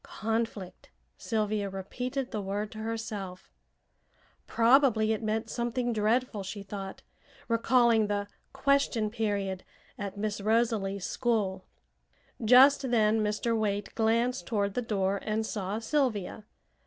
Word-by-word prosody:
"'Conflict,'" 220 -3 -4 0.3
Sylvia 215 -3 -1
repeated 250 +8 -4
the 210 - -2
word 205 +2 -3
to 215 - -9
herself. 220 -4 -5 1.0
Probably 230 -2 +4
it 220 - -3
meant 220 0 -1
something 240 0 -1
dreadful, 220 +1 +1
she 195 +1 -6
thought, 195 -1 -7 0.4
recalling 230 -1 +3
the 205 0 -2 0.2
"question 270 -5 +1
period" 200 -4 -2 0.4
at 200 -1 -5
Miss 210 0 -2
Rosalie's 215 -3 +1
school. 210 -6 -1 0.8
Just 265 +4 +6
then 220 -2 +3
Mr. 210 +2 0
Waite 205 -2 -1
glanced 230 -3 +1
toward 200 -3 0
the 250 - -1
door 200 -3 0
and 220 +1 -1
saw 205 -1 -3
Sylvia. 225 -5 -1
215 Hz, 115 wpm, -29 LUFS, 200-235 Hz, 1.0 s, Just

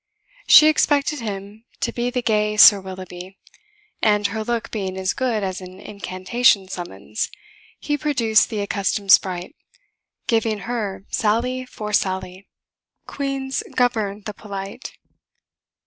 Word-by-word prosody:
She 305 - +9
expected 295 -1 +2
him 205 -1 -7 0.2
to - - 0
be 240 0 -1
the 245 0 -2
gay 210 -1 +1
Sir 205 -2 +9
Willoughby, 185 0 -9 0.6
and 210 -1 +2
her 220 +2 -1
look 235 0 -3
being 190 -3 -4
as 190 0 -1
good 240 -5 -1
as 190 -1 -3
an 185 0 -11
incantation 200 +1 +1
summons, 110 - -5 0.5
he 295 -1 -2
produced 240 -7 +2
the 215 -3 -3
accustomed 200 0 -1
sprite, 185 - +3 0.7
giving 225 -3 0
her 205 -4 -4
sally 250 +4 0
for 210 -3 -7
sally. 190 -1 -1 0.6
Queens 275 -1 -3
govern 215 -5 0
the 210 - -5
polite. 200 +2 -8
210 Hz, 125 wpm, -22 LUFS, 195-240 Hz, 0.7 s, She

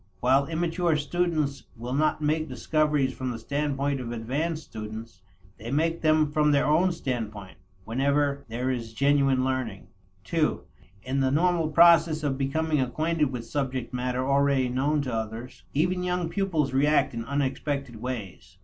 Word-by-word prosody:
While 135 +3 +3
immature 165 0 0
students 155 -2 -1
will 120 +3 -5
not 155 +2 +1
make 155 +1 0
discoveries 150 -4 +1
from 130 -1 -4
the 120 - -4
standpoint 140 +2 -1
of 120 -1 -5
advanced 145 +8 -2
students, 110 -2 -8 0.4
they 115 +3 -7
make 165 +5 0
them 155 -1 +3
from 150 0 +3
their 145 -1 +3
own 165 +5 +3
standpoint, 110 - -5 0.3
whenever 140 +3 +1
there 125 +3 -1
is 115 -3 -4
genuine 140 -1 +3
learning. 130 -7 -3 0.4
(ii) 160 -2 +3 0.5
In 130 +2 -1
the 135 -1 +2
normal 165 +2 +2
process 165 -1 +5
of 140 -2 0
becoming 150 +2 0
acquainted 150 +3 0
with 120 -3 -5
subject 130 -3 -3
matter 125 +1 -1
already 140 -2 +2
known 140 +4 +1
to 130 -3 -4
others, 110 +2 -5
even 180 +5 +1
young 180 -2 -1
pupils 165 -9 0
react 145 +2 +3
in 115 0 -4
unexpected 140 -1 -2
ways. 105 -6 -6
140 Hz, 150 wpm, -26 LUFS, 125-155 Hz, 0.5 s, process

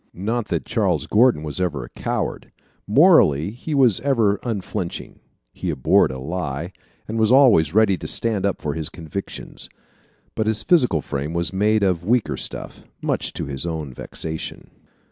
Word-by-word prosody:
Not 110 +5 -2
that 85 -7 -2
Charles - - 0
Gordon 110 -7 +3
was 75 +4 -4
ever 75 -8 -1
a - - -10
coward. - - -4 0.4
Morally 105 - +5
he 135 +7 -5
was 125 -8 +5
ever 115 -8 +2
unflinching. 100 -5 -4 0.3
He - - -4
abhorred 65 - +3
a 65 - -5
lie, 80 +3 -4 0.3
and 115 +1 -3
was 110 +1 +3
always 110 - +5
ready 105 -4 +4
to - - -6
stand 110 -4 +1
up 100 -1 0
for 75 - -1
his 80 0 -3
convictions. 90 +4 -7 0.6
But 110 - -1
his 110 0 +1
physical 125 - +3
frame 70 +3 -4
was 85 +2 -1
made 105 +2 +2
of 90 -3 +1
weaker 115 +4 +1
stuff - - -6 0.2
much - - -1
to - - -4
his 70 -1 -5
own 80 -5 -4
vexation. 80 +5 -6
95 Hz, 165 wpm, -22 LUFS, 80-110 Hz, 0.6 s, Morally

